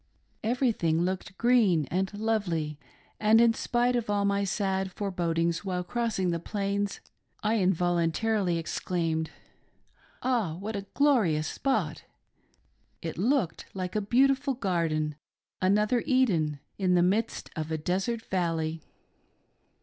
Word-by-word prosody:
Everything 215 -9 +1
looked 185 +1 -3
green 220 - +4
and 190 +3 0
lovely, 180 -9 -1 0.4
and 215 +1 +5
in 235 -1 +5
spite 245 +2 +1
of 235 -3 -1
all 205 -1 +1
my 200 0 +1
sad 190 -1 -1
forebodings 170 -4 -1
while 180 -2 -2
cross 230 +4 -2
ing 185 -2 +1
the 170 - -1
Plains, 200 +2 -2 0.4
I 220 +1 +2
involuntarily 180 +2 +1
exclaimed, 165 -1 -2 0.5
" - - -28
Ah, 230 -11 +1
what 205 +5 -5
a 200 0 -5
glorious 220 - +3
spot 270 -1 -1 0.5
!" - - -40
It 165 0 -4
looked 225 - 0
like 185 0 -4
a 215 - +2
beautiful 265 +5 +2
garden 165 - -1 0.2
— - - -51
another 210 +5 +3
Eden 175 - +2
— - - -46
in 185 -2 +3
the 175 - +4
midst 210 +5 0
of 155 -1 -3
a 160 - 0
desert 195 +8 -1
valley. 165 -3 -1
190 Hz, 135 wpm, -28 LUFS, 170-225 Hz, 0.5 s, and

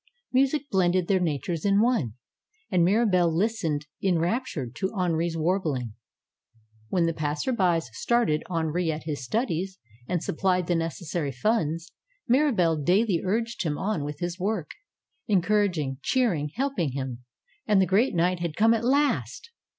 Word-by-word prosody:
Mu 265 +2 +5
sic 290 +1 -3
blended 185 -2 +2
their 195 -2 +3
natures 160 -1 -2
in 200 0 +3
one. 220 - +2 0.6
And 180 -3 +3
Mirabelle 185 -3 +3
lis 215 +7 0
tened 150 -2 0 0.2
enraptured 175 - -1
to 190 -1 -1
Henri's 170 -2 0
warbling. 155 - -1 1.0
When 175 -2 +2
the 165 - 0
pass 150 -1 -2
erby 185 -10 +2
started 155 - 0
Henri 165 0 0
at 155 0 -5
his 150 -4 -4
studies, 190 - -2 0.3
and 175 -2 -1
supplied 180 +1 0
the 175 - 0
nec 165 -1 -1
essary 160 -4 -3
funds, 170 - 0 0.4
Mirabelle 235 - +3
daily 185 +3 +2
urged 230 +5 -1
him 150 -3 -1
on 195 -7 -1
with 145 0 -6
his 175 +1 -3
work; 195 -3 -2 0.6
encouraging, 180 - +1
cheering, 180 - +1
helping 245 - -1
him. 130 -3 -5 0.4
And 210 -2 +4
the 190 - +4
great 200 +5 +2
night 175 +1 +2
had 170 -3 -3
come 225 +2 +4
at 230 0 -1
last 255 - 0
180 Hz, 150 wpm, -26 LUFS, 160-210 Hz, 1.0 s, Mu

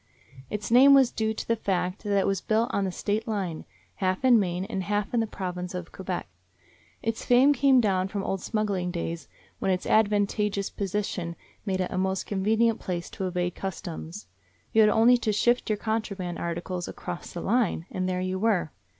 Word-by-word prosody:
Its 210 +1 -4
name 270 +4 +8
was 265 -3 +5
due 220 0 -1
to 220 - -5
the 230 - +2
fact 185 -3 -2
that 200 -1 +1
it 195 - +2
was 195 -2 0
built 225 +3 +1
on 200 - +1
the 190 - -2
State 210 +5 -2
line, 190 -7 -3 0.3
half 185 +5 0
in 245 -3 +7
Maine 180 -1 -1
and 195 - -3
half 205 +3 -2
in 240 - +3
the 225 - 0
Province 180 -2 -5
of 180 -1 -6
Quebec. 185 -1 -4 0.8
Its 225 0 -2
fame 255 +4 +5
came 270 -1 +4
down 190 -5 +2
from 195 0 -4
old 195 -1 -2
smuggling 200 -5 -1
days, 170 -1 -4 0.3
when - - -1
its 185 -1 0
advantageous 205 -1 +1
position 195 -3 -3 0.3
made 190 -1 0
it 180 - -2
a 185 - -1
most 190 0 -1
convenient 220 +3 +1
place 175 -2 -4
to 190 - -3
evade 180 -1 -1
customs. 180 -1 -6 0.5
You 220 - +6
had 215 - +6
only 230 +4 +5
to 220 - 0
shift 240 +4 +2
your 215 - +1
contraband 200 -5 -3
articles 175 +1 -3
across 170 - -7
the 175 - -5
line, 215 -6 +1
and 185 0 -2
there 180 0 -1
you 185 0 -2
were. 200 -7 +1
195 Hz, 195 wpm, -27 LUFS, 180-220 Hz, 0.8 s, name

